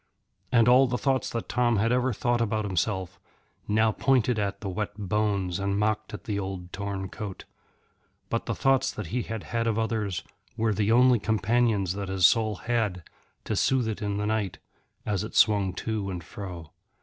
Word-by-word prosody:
And 115 -1 +5
all 130 +2 +6
the 125 0 -1
thoughts 135 -1 0
that 115 - -4
Tom 120 -2 +2
had 115 +4 +2
ever 125 +1 +2
thought 120 +2 0
about 110 -1 0
himself 95 -1 -2 0.5
now 110 +1 +3
pointed 125 -1 +2
at 100 -1 -2
the 105 - -4
wet 105 +2 -3
bones 100 -3 -1
and 100 0 0
mocked 110 0 0
at 105 - -7
the 100 -2 -2
old 95 -2 -6
torn 100 -1 -3
coat. 100 0 -7 0.8
But - - -2
the - - -1
thoughts 135 -1 +2
that 105 - -6
he 125 - +1
had 115 -2 -5
had 115 -1 -2
of 110 -1 +1
others 110 -6 -1 0.3
were 110 -1 +1
the 105 +2 +1
only 125 0 +5
companions 110 -2 +1
that 100 -1 -5
his 95 -2 +3
soul 110 +3 +4
had 105 -5 -1 0.4
to - - -2
soothe 130 -3 +2
it 110 0 -4
in 100 -1 -1
the 105 - -1
night 105 -3 -1 0.5
as 105 -2 -1
it 110 - -7
swung 100 -3 +4
to 110 -3 -3
and 90 -3 -5
fro. 90 -3 -8
105 Hz, 185 wpm, -27 LUFS, 100-115 Hz, 0.8 s, all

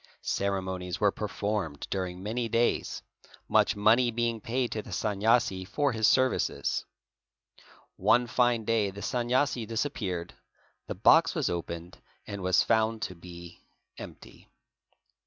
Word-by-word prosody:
Ceremonies 95 -2 -2
were 105 -1 +3
performed 100 -7 -3
during 90 -1 -3
many 115 +3 -2
days, 115 +2 0 0.4
much - - +3
money 115 +4 +4
being 115 -1 -1
paid 125 +2 -1
to 110 - -3
the 110 - -13
Sanyasi 105 +1 +1
for 140 +9 0
his 110 -2 +2
services. 130 0 +1 1.1
One 125 0 +3
fine 120 -2 +1
day 110 -3 +1
the 100 +1 -9
Sanyasi 125 -1 0
disappeared, 110 -8 -3 0.5
the - - -4
box - - +5
was - - 0
opened 85 +1 -6 0.3
and 100 -1 -6
was 90 -1 +3
found 110 0 +1
to - - -4
be 85 -1 -12 0.4
empty. - - -12
105 Hz, 125 wpm, -28 LUFS, 95-120 Hz, 1.1 s, box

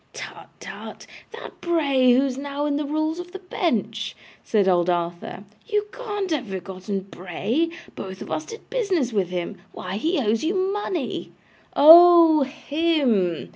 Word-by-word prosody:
'Tut, - - -9
tut. - - -9 0.3
That 460 +1 -11
Bray 280 -7 +3
who 265 +2 +3
is 265 -2 -3
now 285 +1 -4
in 290 -1 0
the 295 +1 -2
Rules 310 +2 -1
of 355 +1 -9
the - - -5
Bench,' 230 - -2 0.3
said 205 -4 +1
old 175 -1 +2
Arthur. 175 +2 -3 0.2
'You 420 -1 0
can't 415 -7 -4
have 275 -6 -1
forgotten 190 +1 -5
Bray. 195 - -2 0.3
Both 190 0 -7
of - - -11
us 310 - -2
did 450 0 -11
business 370 - 0
with 195 -4 0
him. 180 -1 -4 0.2
Why, 185 +2 -5
he 330 - 0
owes 225 -1 0
you 340 +5 0
money!' 380 -5 -2 0.4
'Oh 330 0 +8
HIM! 275 - 0
285 Hz, 155 wpm, -23 LUFS, -, 0.4 s, Oh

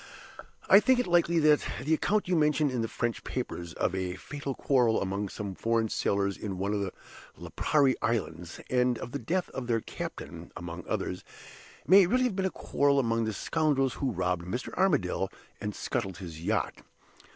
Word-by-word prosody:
I 195 +1 +9
think 260 +3 +4
it 250 - +1
likely 170 -1 +3
that 150 -2 +5 0.2
the 155 +4 +1
account 205 +6 +1
you 180 - +2
mention 150 -2 +3
in 125 -2 -1
the 115 - -1
French 115 0 -2
papers, 85 -2 -4
of - - 0
a 95 -1 -2
fatal 140 +7 -5
quarrel 125 -5 +3
among 100 +1 -2
some 100 -1 -5
foreign 115 +2 0
sailors 100 -1 0
in 100 -3 -5
one 100 +2 -1
of 105 - 0
the 95 -2 -2 0.5
Lipari 140 -3 +2
Islands, 90 -7 -2
and 125 -1 +2
of 120 - -7
the 140 - -3
death 175 +10 -1
of 125 -2 -5
their 115 -2 +2
captain, - - -7
among 85 0 -7
others, 90 +1 -2 0.6
may 190 +2 +7
really 255 +6 +2
have 245 -6 0
been 190 0 0
a - - -1
quarrel 140 -5 +1
among 115 -3 +1
the 110 - -2
scoundrels 140 0 +1
who 135 - -2
robbed 90 -4 -1
Mr. 120 +7 -4
Armadale 95 - +1 0.3
and 105 0 -4
scuttled 95 -6 -3
his 85 -3 -8
yacht. - - -1
120 Hz, 185 wpm, -29 LUFS, 95-150 Hz, 0.6 s, I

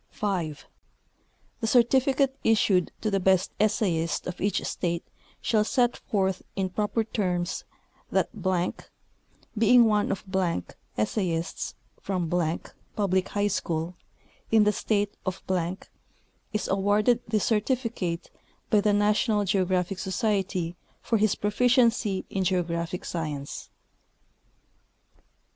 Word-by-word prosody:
5. 175 -8 -3 0.9
The 225 - -1
certificate 265 +3 +3
issued 200 -5 +3
to 215 - 0
the 195 - +2
best 190 0 +3
essayist 185 -6 +1
of 180 0 -6
each 200 +1 +1
state 170 -1 -2 0.4
shall 215 -2 +3
set 240 +2 +2
forth 190 -2 -1
in 190 -1 -1
proper 210 +3 0
terms 180 -5 -2 0.5
that, - - +2 1.3
being 230 +2 +6
one 210 -2 +2
of 195 - -3 0.7
essayists 165 - -1 0.3
from 180 -4 -2 0.6
public 190 -3 +1
high 205 0 0
schools 165 -3 -2 0.6
in 220 -1 +5
the 210 - +4
state' 205 -1 0
of, 185 -1 -4 1.1
is 215 - -2
awarded 205 +5 +3
this 215 -2 +1
certificate 220 -6 -1 0.4
by 210 - +5
the 210 0 +3
National 210 +1 +2
Geographic 185 -1 +1
Society 190 -3 -1 0.2
for 225 - 0
his 215 0 +3
proficiency 230 -2 +2
in 195 - 0
geographic 175 -1 -1
science. 150 -4 -4
200 Hz, 105 wpm, -27 LUFS, 180-220 Hz, 1.3 s, being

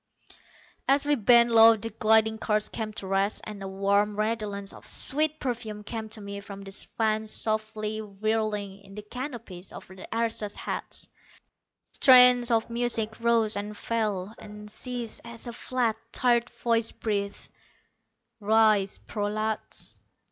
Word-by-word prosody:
As 275 +1 +4
we 295 - +3
bent 235 -1 +5
low 225 0 +8
the 225 +2 -6
gliding 220 0 +3
cars 210 -1 0
came 220 -1 -4
to 205 - -7
rest, 195 +2 0
and 210 -2 -8
a 195 - -5
warm 200 +2 +1
redolence 210 -2 -2
of - - -14
sweet 305 +2 +1
perfume 225 -5 -4
came 220 0 -5
to 220 0 -7
me 200 0 -6
from 200 0 -9
the 195 - -9 0.3
fans 220 -1 0
softly 215 0 -2
whirling 210 -1 -2
in 195 0 -14
the 210 - -7
canopies 230 -6 -7
over 190 - -11
the 190 - -10
aristos' 225 -2 -2
heads. - - -5 0.8
Strains 250 -2 +7
of 230 -1 +2
music 230 -2 0
rose 230 -2 +3
and 205 +1 -5
fell, 215 -3 -2
and 210 0 -11
ceased 240 0 -5
as 235 0 -8
a 240 - -6
flat, 240 -2 -1
tired 240 -1 +3
voice 230 -1 +1
breathed: 200 -2 -4 0.9
"Rise, 215 -2 +3
prolats." 215 +1 -2
220 Hz, 140 wpm, -27 LUFS, 205-230 Hz, 0.9 s, low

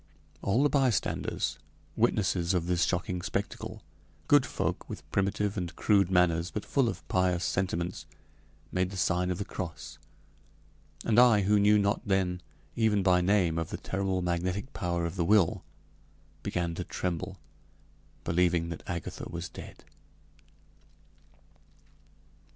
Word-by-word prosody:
All 115 +8 +2
the 145 - +4
bystanders, 130 - 0 0.4
witnesses 95 -3 +1
of 85 -2 0
this 90 -1 +2
shocking 90 -1 -1
spectacle, 100 +2 -4 0.4
good - - +5
folk - - -3
with - - -8
primitive 100 +1 0
and 90 -2 -4
crude 100 -4 +3
manners, 90 -2 +3
but 105 - -5
full 135 -4 +2
of - - -7
pious 90 -1 +1
sentiments, 90 -1 -2 0.6
made 90 0 0
the 95 - -7
sign 90 0 +1
of 90 - -1
the 100 - -3
cross, 85 -5 -7 1.1
and 115 0 +4
I 120 -4 +6
who 105 +2 +3
knew 105 +1 +5
not 100 0 +1
then, 95 -2 0 0.3
even 110 -3 +2
by 90 -1 +4
name, 90 -3 +2
of 80 - -3
the - - -4
terrible 95 -1 -2
magnetic 90 +7 -2
power 85 -1 -1
of 85 +3 -4
the 85 - +2
will, 100 -3 +3 0.8
began 85 -1 -2
to - - -4
tremble, 85 -3 -3 0.9
believing 85 -1 +1
that 85 - -6
Agatha 85 -4 -5
was 85 +1 -5
dead. - - -11
90 Hz, 135 wpm, -29 LUFS, 85-100 Hz, 1.1 s, I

